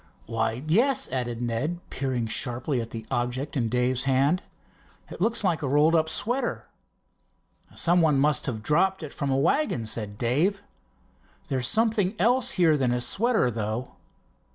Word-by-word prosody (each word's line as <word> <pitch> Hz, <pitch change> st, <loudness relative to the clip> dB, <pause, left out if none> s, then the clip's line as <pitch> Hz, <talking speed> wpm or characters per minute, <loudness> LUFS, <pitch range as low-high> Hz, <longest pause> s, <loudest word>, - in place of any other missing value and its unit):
"Why, 115 Hz, +2 st, -2 dB
yes," 240 Hz, -, +3 dB
added 120 Hz, -2 st, -3 dB
Ned, 125 Hz, +9 st, -2 dB
peering 130 Hz, -3 st, -2 dB
sharply 125 Hz, +3 st, 0 dB
at 115 Hz, -, -7 dB
the 115 Hz, -1 st, -8 dB
object 125 Hz, +4 st, -3 dB
in 120 Hz, -5 st, 0 dB
Dave's 125 Hz, +2 st, +1 dB
hand. 135 Hz, +7 st, +2 dB, 0.7 s
"It -, -, -9 dB
looks 225 Hz, +2 st, +1 dB
like 175 Hz, -5 st, 0 dB
a 145 Hz, -, -2 dB
rolled 150 Hz, +4 st, +3 dB
up 160 Hz, -1 st, +2 dB
sweater." 240 Hz, +10 st, -2 dB, 1.1 s
"Some 175 Hz, +1 st, +3 dB
one 155 Hz, -4 st, +3 dB
must 145 Hz, +2 st, +2 dB
have 110 Hz, -5 st, -4 dB
dropped 190 Hz, -, +1 dB
it 150 Hz, -, -7 dB
from 140 Hz, -, -3 dB
a 135 Hz, -, +1 dB
wagon," 140 Hz, -, 0 dB
said 105 Hz, -2 st, -2 dB
Dave. 165 Hz, -, 0 dB, 0.9 s
"There's 130 Hz, -2 st, 0 dB
something 220 Hz, -, +2 dB
else 250 Hz, +5 st, +2 dB
here 165 Hz, -4 st, +3 dB
than 130 Hz, -3 st, 0 dB
a 125 Hz, -, 0 dB
sweater, 195 Hz, -, +1 dB
though." 110 Hz, +3 st, -4 dB
140 Hz, 155 wpm, -25 LUFS, 120-180 Hz, 1.1 s, yes